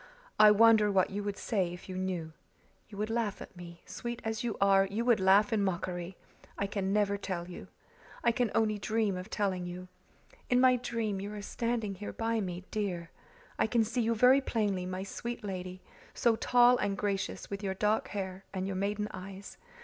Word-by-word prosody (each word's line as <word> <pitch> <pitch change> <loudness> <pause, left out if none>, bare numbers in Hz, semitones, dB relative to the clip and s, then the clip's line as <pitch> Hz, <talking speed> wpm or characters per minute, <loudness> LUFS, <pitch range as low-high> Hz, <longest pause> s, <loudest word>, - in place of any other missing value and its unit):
"I 215 - +9
wonder 215 0 +6
what 190 -1 +2
you 205 +1 -3
would 205 -1 -3
say 190 -6 -1
if 175 +1 -10
you 185 - -6
knew. 180 -4 -3 0.6
You 205 - -11
would 215 +2 -2
laugh 225 -3 -1
at - - -11
me 170 -1 -11
sweet 240 0 -5
as 220 +1 -2
you 235 -3 -2
are, 195 -1 +5
you 215 +4 -2
would 240 -3 +4
laugh 200 +4 +5
in 210 -2 +2
mockery. 180 -1 -3 0.4
I 200 - 0
can 195 -1 -2
never 200 -1 +2
tell 180 -3 -4
you. 180 - -9 0.6
I 235 - +4
can 240 -1 0
only 215 -2 +2
dream 215 -1 0
of 180 +3 -6
telling 190 -5 -1
you. 180 +1 -8 0.6
In 245 - +4
my 255 -1 +5
dream 225 -5 -2
you 200 +1 -5
are 205 - -6
standing 230 -2 -2
here 205 +2 -7
by 225 0 -1
me, 180 -2 -4
dear. 185 -5 -3 0.5
I - - +3
can 230 0 +3
see 240 +3 -1
you 230 0 +1
very 255 +5 +6
plainly, 205 -8 -1
my 185 +1 -4
sweet 235 +4 -6
lady, 185 -2 -6 0.3
so 235 -2 +3
tall 245 +2 +5
and 200 -3 -1
gracious, 200 -1 -3
with 200 0 -4
your 190 -2 -2
dark 210 +2 +1
hair 190 -1 -5
and 190 0 -2
your 195 -1 -3
maiden 205 +2 -1
eyes. 190 +1 -9
200 Hz, 200 wpm, -31 LUFS, 190-225 Hz, 0.6 s, I